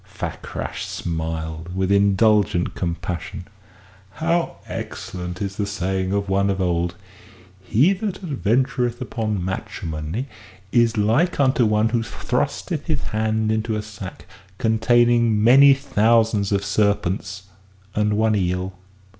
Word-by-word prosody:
Fakrash - - -6
smiled 80 +1 -4
with 95 0 0
indulgent 100 -2 +3
compassion. 90 0 -4 0.7
"How 165 - 0
excellent 90 +1 -6
is 100 0 -4
the 100 - -1
saying 95 -2 -2
of 100 0 0
one 100 +1 +2
of 95 -1 -1
old: 85 -1 0 0.7
'He 130 - +3
that 195 0 -4
adventureth 125 - 0
upon 110 -6 -2
matrimony 85 - -4 0.4
is 120 -2 +3
like 115 - +2
unto 130 -4 +3
one 105 +1 +2
who 115 +1 +1
thrusteth 115 - -2
his - - -1
hand 110 0 0
into 110 0 -1
a 105 - -3
sack 100 -3 -9 0.3
containing 115 0 +3
many 135 +4 +8
thousands 115 -5 +2
of 100 0 0
serpents 100 -2 0 0.5
and 105 0 +1
one 110 0 +2
eel. 90 0 -1
105 Hz, 120 wpm, -22 LUFS, 95-115 Hz, 0.7 s, many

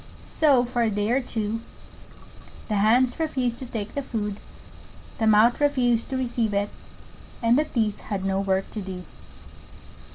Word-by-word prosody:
So 275 -6 +4
for 245 0 -1
a 230 - +3
day 205 +1 -1
or 265 +2 +3
two 225 -2 -3 1.1
the 210 - +1
Hands 240 +7 +3
refused 260 -7 -1
to 260 - -7
take 220 -3 -5
the 285 - -2
food, 210 -6 -3 0.8
the 220 - +2
Mouth 220 +5 +5
refused 245 -5 +2
to 265 - -2
receive 240 -4 -1
it, 200 +1 0 0.7
and 230 +1 +4
the 300 +3 +3
Teeth 220 -7 -1
had 195 -3 -4
no 195 0 +1
work 195 -1 0
to 215 - -5
do. 185 -2 -6
230 Hz, 160 wpm, -25 LUFS, 205-250 Hz, 1.1 s, Mouth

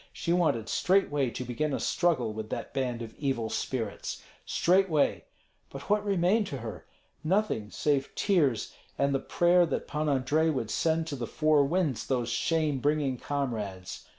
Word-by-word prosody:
She 170 - -1
wanted 155 -11 +1
straightway 145 - +2
to 125 +2 -5
begin 140 +4 -1
a - - -3
struggle 140 -11 +1
with 110 0 -6
that - - -5
band 125 -3 -2
of 115 -1 -9
evil 130 -6 -1
spirits, 115 -6 -3 0.2
straightway. 180 -4 +2 0.4
But 140 +8 -7
what 210 0 +3
remained 200 +1 +2
to 140 - -4
her? 110 -6 -8 0.4
Nothing, 170 - 0
save 140 +7 0
tears 150 - +1 0.2
and 140 0 +1
the 135 - +1
prayer 175 +5 +3
that 145 - -3
Pan 150 0 -1
Andrei 145 +4 +2
would 125 -8 -2
send 160 0 +1
to 155 -3 -4
the 120 -3 -4
four 155 -2 +3
winds 160 -4 0
those 125 -3 0
shame 155 +1 0
bringing 145 -2 0
comrades. 105 -10 -4
140 Hz, 160 wpm, -29 LUFS, 120-165 Hz, 0.4 s, what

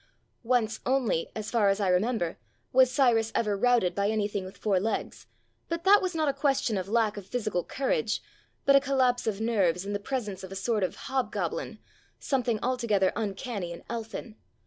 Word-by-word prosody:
Once 230 -2 +1
only, 250 -10 +1
as 215 -1 -5
far 220 -4 +3
as 195 +1 +1
I 200 - +1
remember, 180 -1 +1 0.3
was 260 0 +6
Cyrus 235 -4 +3
ever 210 -3 +1
routed 235 -3 +3
by 200 0 0
anything 205 -2 -1
with 185 - -10
four 200 -4 +1
legs, 220 +4 -3 0.4
but 335 0 -2
that 400 +2 +6
was 365 -2 -2
not 315 -1 +1
a 280 - +2
question 275 -4 +1
of 190 0 -3
lack 220 -2 +1
of 195 -2 -8
physical 215 -6 -1
courage, 455 - -1 0.5
but 275 - +6
a - - +8
collapse 260 -3 +1
of 210 -2 -1
nerves 195 -6 +1
in 205 - -3
the 205 - -1
presence 210 -4 -4
of 190 - -8
a - - -6
sort 210 +1 0
of 180 - -1
hobgoblin, 260 -1 -2 0.4
something 245 -5 0
altogether 235 -7 +1
uncanny 205 -3 -3
and 170 - -9
elfin. 225 -1 -6
225 Hz, 185 wpm, -28 LUFS, 200-255 Hz, 0.5 s, a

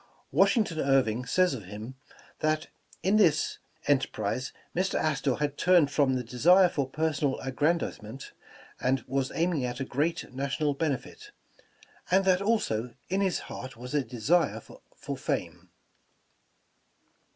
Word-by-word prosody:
Washington 210 -10 +3
Irving 125 -4 +2
says 185 +5 +3
of 110 -7 -6
him, 105 +6 -8 0.5
that 155 0 0 0.3
in 195 +3 +3
this 160 -7 +3 0.3
enterprise 135 -2 0 0.2
Mr. 185 +2 0
Astor 140 -4 +1
had 145 -1 -2
turned 175 -5 +4
from 140 -3 +2
the 125 - -2
desire 175 +11 +5
for 140 -5 -2
personal 150 -2 0
aggrandizement, 135 -4 -2 0.5
and 130 0 +1
was 135 0 -1
aiming 165 -4 +1
at 125 +1 -3
a 135 - -2
great 145 +1 -2
national 140 +2 -1
benefit, 155 - -3 0.8
and 190 +1 +3
that 185 0 +3
also, 140 - 0
in 190 +2 +1
his 190 -3 0
heart 130 -2 -8
was 125 +3 -8
a 145 -2 +2
desire 135 +9 +1
for - - -9
fame. - - -3
145 Hz, 130 wpm, -28 LUFS, 130-170 Hz, 0.8 s, desire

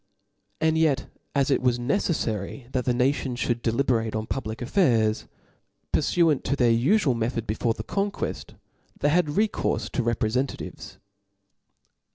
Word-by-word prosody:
And 160 0 +2
yet 145 -4 +2 0.3
as 140 0 +2
it - - +2
was 125 -1 +2
necelfary 120 - -2
that 125 -2 -1
the 125 - +2
nation 130 0 +1
(hould 120 -1 -1
dell. 115 -1 0
berate 115 -5 0
on 110 0 -2
public 110 -3 -4
affairs, 115 - +2 0.7
purfuant 165 -6 +3
to 140 - +1
their 120 -4 +3
ufual 140 - +3
method 115 0 -2
before 110 +2 -1
the 110 - -6
conqueft; 200 - -3 0.4
they 145 - +2
had 170 +1 +3
rccourfe 210 +9 0
to 130 - 0
reprefentativcs. 120 +3 -2
125 Hz, 140 wpm, -25 LUFS, 115-145 Hz, 0.7 s, purfuant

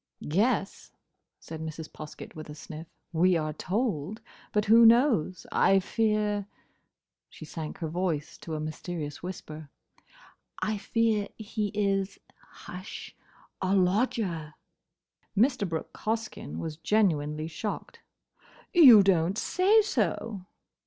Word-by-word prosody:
"Yes," 205 +1 0 0.5
said 160 -1 -8
Mrs. 160 0 -6
Poskett, 155 -1 -9
with 155 -1 -8
a 150 - -7
sniff, 155 +1 -9 0.3
"we 175 +2 +4
are 155 -1 -2
told. 205 - -2 0.3
But 210 0 +1
who 225 +2 +7
knows?—I 225 - +4
fear—" 210 0 0 0.8
she 155 - -11
sank 155 0 -6
her 165 - -3
voice 165 -2 -2
to 160 - -5
a - - -3
mysterious 155 -1 -5
whisper—"I 180 - -8
fear 220 -2 +1
he 215 -1 -3
is—hush!—a 210 0 +1 1.9
lodger!" 185 -5 0 0.8
Mr. 230 -3 +3
Brooke 160 -1 -4
Hoskyn 220 0 -4
was 155 -2 -5
genuinely 155 -6 +1
shocked. 185 +6 -5 0.7
"You 255 - +9
don't 185 0 +2
say 405 - +4
so!" 215 - -2
190 Hz, 105 wpm, -28 LUFS, 160-220 Hz, 1.9 s, You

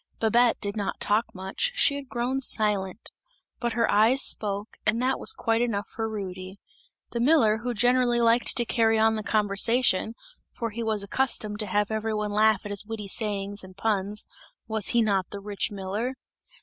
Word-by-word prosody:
Babette 235 +2 +3
did 200 0 -4
not 205 -2 -3
talk 215 +3 +1
much, 190 - -2
she 285 - +3
had 280 -2 -7
grown 250 +3 -1
silent; 210 -5 -1 0.5
but 240 -2 -1
her 230 0 +2
eyes 225 +6 +4
spoke 205 0 -3
and 215 +2 +1
that 260 +2 0
was - - +3
quite 230 - 0
enough 210 -4 -1
for 225 0 -4
Rudy. 190 -2 -6 0.5
The 235 - -3
miller 235 -5 +4
who 240 +1 -3
generally 245 +1 +3
liked 235 +2 +3
to 240 - +4
carry 225 -1 +2
on 220 0 +4
the 215 - -2
conversation 215 +1 +2 0.3
for 230 -1 -5
he 230 +3 -5
was 220 -3 -1
accustomed 210 -2 -2
to 210 - -1
have 205 +2 0
every 220 0 -1
one 210 -1 -2
laugh 215 0 +3
at 205 - -5
his 200 - -1
witty 210 -2 -6
sayings 205 -1 -1
and 185 0 -13
puns 205 -1 0 0.4
was 220 -2 -2
he 235 -1 +3
not 195 -4 0
the 200 - -7
rich 200 0 -3
miller? 205 +6 -4
220 Hz, 185 wpm, -26 LUFS, 205-235 Hz, 0.5 s, eyes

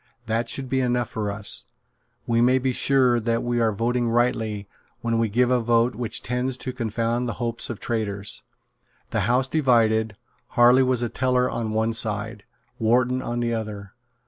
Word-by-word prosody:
That 115 +1 -1
should 135 -1 -1
be 130 +1 0
enough 125 -1 0
for 105 -2 -3
us. 100 0 -3 0.6
We 115 0 +2
may 125 +2 +4
be 130 0 0
sure 130 -2 +3
that 115 0 -1
we 120 0 0
are 110 -1 +3
voting 120 +3 0
rightly 115 -4 0 0.3
when 115 -1 0
we 115 -1 +1
give 125 +4 +2
a 125 - +3
vote 120 +1 +2
which 115 0 -2
tends 125 +1 -2
to 130 0 -5
confound 115 0 -1
the - - -2
hopes 115 -1 -2
of 120 - -5
traitors." 100 -4 -3 0.7
The 100 - 0
House 130 +2 +3
divided. 110 -7 +2 0.4
Harley 120 +2 +6
was 130 -2 +1
a 120 - -1
teller 125 0 +1
on 115 -2 -3
one 110 +1 0
side, 105 -2 0 0.3
Wharton 125 +3 +2
on 120 -1 -3
the 120 0 0
other. 105 -3 -5
120 Hz, 175 wpm, -24 LUFS, 110-125 Hz, 0.7 s, Harley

